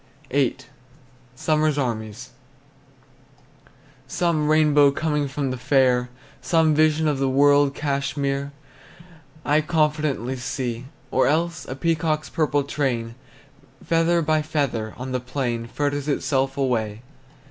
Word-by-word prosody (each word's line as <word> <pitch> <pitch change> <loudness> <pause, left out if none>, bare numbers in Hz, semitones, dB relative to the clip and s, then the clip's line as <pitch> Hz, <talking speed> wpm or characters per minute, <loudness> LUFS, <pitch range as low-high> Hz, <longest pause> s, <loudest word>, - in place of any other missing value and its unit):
VIII. 135 -2 +1 0.8
SUMMER'S 155 +2 +1
ARMIES. 115 -3 -3 1.8
Some 160 0 0
rainbow 150 -2 +5
coming 150 0 -1
from 140 -1 -3
the 130 - -5
fair! 125 -2 +2 0.3
Some 160 +4 +3
vision 155 +1 +3
of 145 -3 0
the 135 -1 +1
world 145 +1 +4
Cashmere 140 -1 -2 0.9
I 150 +1 +3
confidently 150 -5 0
see! 125 -1 -4 0.3
Or 130 - +3
else 160 0 0
a 130 - -5
peacock's 155 +1 -1
purple 145 -3 +1
train, 125 -5 -2 0.7
Feather 165 0 +2
by 155 0 +2
feather, 135 -8 -2
on 130 +1 -6
the 130 - 0
plain 125 -2 -3
Fritters 145 +2 -2
itself 135 -2 0
away! 115 -5 -1
140 Hz, 115 wpm, -23 LUFS, 130-155 Hz, 1.8 s, rainbow